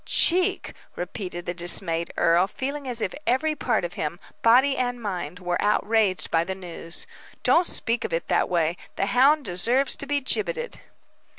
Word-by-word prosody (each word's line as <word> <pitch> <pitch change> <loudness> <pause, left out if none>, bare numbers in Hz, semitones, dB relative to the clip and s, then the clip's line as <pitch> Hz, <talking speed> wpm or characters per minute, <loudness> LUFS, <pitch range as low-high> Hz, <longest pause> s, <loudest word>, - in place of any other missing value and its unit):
"Cheek!" 365 +3 +2 0.2
repeated 180 -1 -6
the 175 - -2
dismayed 170 -1 +2
earl, 170 +3 +4
feeling 275 +6 -5
as 240 -2 -3
if 185 - -2
every 305 +6 +2
part 240 -10 0
of 175 - -6
him, 160 +3 -4 0.2
body 260 +4 +5
and 245 -1 -1
mind, 180 -6 -4
were 180 -1 -2
outraged 210 -2 +1
by 165 0 +3
the 190 +2 -4
news, 175 -2 -8 0.4
"don't 345 +1 +4
speak 230 0 0
of - - -4
it 165 0 -1
in - - -40
that - - +2
way. 170 -1 +1 0.2
The - - 0
hound 275 +6 +4
deserves 235 +9 +1
to 280 - -5
be 290 0 +1
gibbeted." 475 - -3
210 Hz, 175 wpm, -25 LUFS, 175-265 Hz, 0.4 s, body